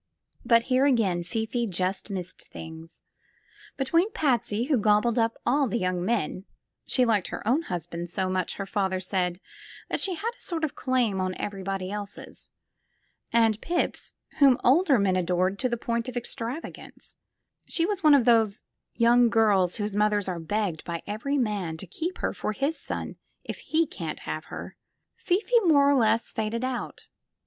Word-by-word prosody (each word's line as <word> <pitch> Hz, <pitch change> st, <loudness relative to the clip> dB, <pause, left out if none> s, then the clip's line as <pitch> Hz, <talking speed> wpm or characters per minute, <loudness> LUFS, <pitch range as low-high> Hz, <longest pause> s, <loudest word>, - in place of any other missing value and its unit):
But 230 Hz, -1 st, +4 dB
here 260 Hz, +2 st, +2 dB
again 200 Hz, -10 st, +2 dB
Fifi 225 Hz, +6 st, -2 dB
just 185 Hz, +2 st, -2 dB
missed 185 Hz, -3 st, -6 dB
things. 160 Hz, +1 st, -10 dB, 0.7 s
Between 335 Hz, +10 st, +2 dB
Patsy, 235 Hz, -6 st, +1 dB
who 270 Hz, -1 st, +1 dB
gobbled 215 Hz, +3 st, +3 dB, 0.3 s
all 275 Hz, +2 st, +3 dB
the 230 Hz, +1 st, -1 dB
young 185 Hz, -4 st, -1 dB
men 195 Hz, -3 st, -1 dB, 0.4 s
(she 255 Hz, -, +3 dB
liked 215 Hz, -5 st, +1 dB
her -, -, -6 dB
own 265 Hz, +8 st, +3 dB
husband 175 Hz, -, -5 dB
so 185 Hz, +1 st, -1 dB
much, 185 Hz, -1 st, -1 dB
her 195 Hz, -, -4 dB
father 195 Hz, -2 st, -1 dB
said, 185 Hz, -1 st, -1 dB, 0.5 s
that -, -, -1 dB
she 375 Hz, -2 st, +1 dB
had 440 Hz, +8 st, -2 dB
a -, -, -20 dB
sort 330 Hz, -2 st, -4 dB
of 305 Hz, -, 0 dB
claim 240 Hz, -7 st, 0 dB
on 185 Hz, 0 st, -2 dB
everybody 195 Hz, -1 st, -4 dB
else's) 205 Hz, -1 st, -7 dB, 0.8 s
and 225 Hz, -2 st, +3 dB
Pips, 345 Hz, +1 st, -2 dB, 0.2 s
whom 275 Hz, -4 st, +6 dB
older 280 Hz, +1 st, +5 dB
men 195 Hz, -3 st, +2 dB
adored 185 Hz, +2 st, 0 dB
to 255 Hz, -, +1 dB
the 240 Hz, -, -1 dB
point 235 Hz, +1 st, -2 dB
of 250 Hz, -, -5 dB
extravagance 240 Hz, +5 st, -6 dB, 0.5 s
(she 335 Hz, -, +1 dB
was 405 Hz, 0 st, -1 dB
one 305 Hz, -2 st, +7 dB
of 260 Hz, -4 st, +3 dB
those 225 Hz, -4 st, +3 dB, 0.3 s
young 240 Hz, +1 st, +5 dB
girls 205 Hz, -6 st, +3 dB
whose 205 Hz, -2 st, -2 dB
mothers 210 Hz, -1 st, +2 dB
are 180 Hz, -2 st, -3 dB
begged 180 Hz, -1 st, -2 dB
by 170 Hz, -1 st, -5 dB
every 260 Hz, +8 st, -2 dB
man 205 Hz, -10 st, -1 dB
to 175 Hz, -, -7 dB
keep 325 Hz, -, -4 dB
her -, -, -2 dB
for 215 Hz, -, -3 dB
his 280 Hz, +8 st, -1 dB
son, -, -, -5 dB, 0.3 s
if -, -, -6 dB
he 325 Hz, +1 st, +1 dB
can't -, -, -6 dB
have -, -, -5 dB
her) -, -, -8 dB, 0.4 s
Fifi 435 Hz, +7 st, +2 dB
more 305 Hz, -9 st, +4 dB
or 285 Hz, -, +5 dB
less 225 Hz, -2 st, +2 dB
faded 225 Hz, +2 st, -2 dB
out. 255 Hz, -1 st, -4 dB
220 Hz, 170 wpm, -26 LUFS, 190-260 Hz, 0.8 s, one